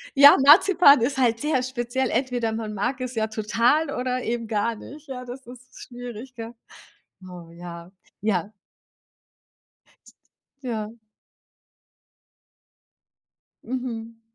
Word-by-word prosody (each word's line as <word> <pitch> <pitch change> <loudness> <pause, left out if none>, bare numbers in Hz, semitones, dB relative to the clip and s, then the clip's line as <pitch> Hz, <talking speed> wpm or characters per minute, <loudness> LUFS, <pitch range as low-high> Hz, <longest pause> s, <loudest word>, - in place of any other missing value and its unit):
Ja, 280 +1 +10
Ja, - - +4
Marzipan 310 - +7
ist 265 +3 0
halt 235 -3 +2
sehr 295 -4 0
speziell. 255 0 -2
Entweder 245 -2 -1
man 220 -1 -4
mag 225 +6 -2
es 255 0 -5
ja 220 -1 0
total 230 +8 +1
oder 255 -1 -2
eben 230 0 -3
gar 220 +1 -1
nicht, 295 +7 -12
ja, 255 -2 -7
das 250 +2 -9
ist 250 +1 -13 0.2
schwierig, 245 0 -9
gell? 230 0 -8 0.8
Oh 175 -2 -11
ja, 170 0 -10 0.3
ja. 200 -2 -1 2.1
Ja. 225 -2 -5 2.7
Mhm. 230 -2 -5
240 Hz, 115 wpm, -24 LUFS, 220-260 Hz, 2.7 s, Ja